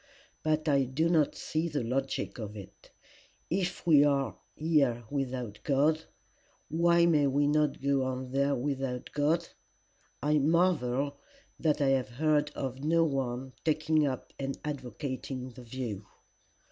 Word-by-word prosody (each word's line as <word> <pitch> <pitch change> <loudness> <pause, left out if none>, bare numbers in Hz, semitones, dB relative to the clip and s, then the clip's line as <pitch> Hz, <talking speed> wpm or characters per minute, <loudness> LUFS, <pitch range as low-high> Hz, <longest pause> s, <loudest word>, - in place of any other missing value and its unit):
But 155 0 0
I 140 -2 +3
do 150 +6 0
not 160 -4 +3
see 160 +2 -2
the 145 -5 -2
logic 135 +2 -2
of 105 -1 -6
it. 100 - -12 0.6
If 180 0 -1
we 150 -4 +7
are 140 -2 +1 0.2
here 140 -7 +2
without 125 -6 -3
God, 155 +3 +2 0.6
why 170 +2 +4
may 150 -4 +4
we 140 +2 +2
not 150 0 +2
go 140 -1 +2
on 130 0 -4
there 140 +1 +2
without 135 -1 -3
God? 160 +4 +1 0.8
I 150 +1 +3
marvel 145 -4 +1 0.4
that 150 -2 +1
I 140 - +3
have 135 -2 +1
heard 150 +4 +1
of 135 0 -4
no 165 +2 +3
one 130 -3 -2
taking 155 -1 +2
up 130 -2 -5
and 135 0 -3
advocating 130 -2 -5
the 125 +1 -12
view. 115 -5 -5
140 Hz, 140 wpm, -30 LUFS, 130-155 Hz, 0.8 s, we